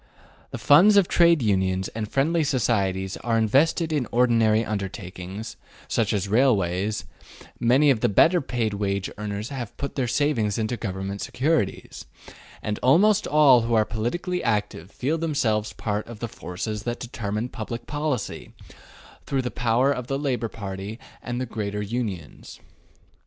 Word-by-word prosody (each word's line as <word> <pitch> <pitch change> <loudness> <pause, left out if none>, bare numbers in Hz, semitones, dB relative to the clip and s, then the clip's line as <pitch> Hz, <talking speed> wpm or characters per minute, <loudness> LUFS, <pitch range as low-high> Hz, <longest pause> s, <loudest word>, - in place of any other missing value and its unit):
The - - -6
funds 195 +9 +6
of 195 -3 +5
Trade 170 -5 +4
Unions 95 -2 +1
and 110 -2 -5
Friendly 160 +4 +2
Societies 100 -8 0
are 115 -1 -1
invested 150 - +2
in 140 -5 0
ordinary 115 -2 +3
undertakings, 100 0 -6 0.3
such - - 0
as 100 -1 -1
railways; 105 - +1 0.5
many 135 +5 +4
of 125 - +1
the - - +2
better 170 - +4
paid 120 -5 -2
wage 100 -1 -2
earners 105 +1 -4
have 130 -6 -6
put 140 - -4
their 130 -3 -1
savings 120 -5 0
into 110 +2 -1
government 95 -2 -5
securities; 145 -6 -2 0.6
and 105 0 -3
almost 195 +11 +4
all 145 -5 +6
who 115 +1 0
are 110 -1 +4
politically 175 +12 -3
active 105 -6 -1
feel 145 +9 -2
themselves 115 -10 0
part 105 -1 -3
of 120 -1 -9
the 115 - -4
forces 105 +1 -5
that 120 +2 -4
determine 110 -2 -4
public 115 -1 -6
policy, 145 -6 -3 0.7
through 135 -2 0
the 125 - -3
power 125 +3 +2
of 125 -3 -3
the 135 - -1
Labor 125 -5 -1
Party 100 0 -6 0.2
and 120 0 -4
the 130 - -2
greater 105 -3 -4
unions. 100 - -5
115 Hz, 150 wpm, -24 LUFS, 105-135 Hz, 0.7 s, funds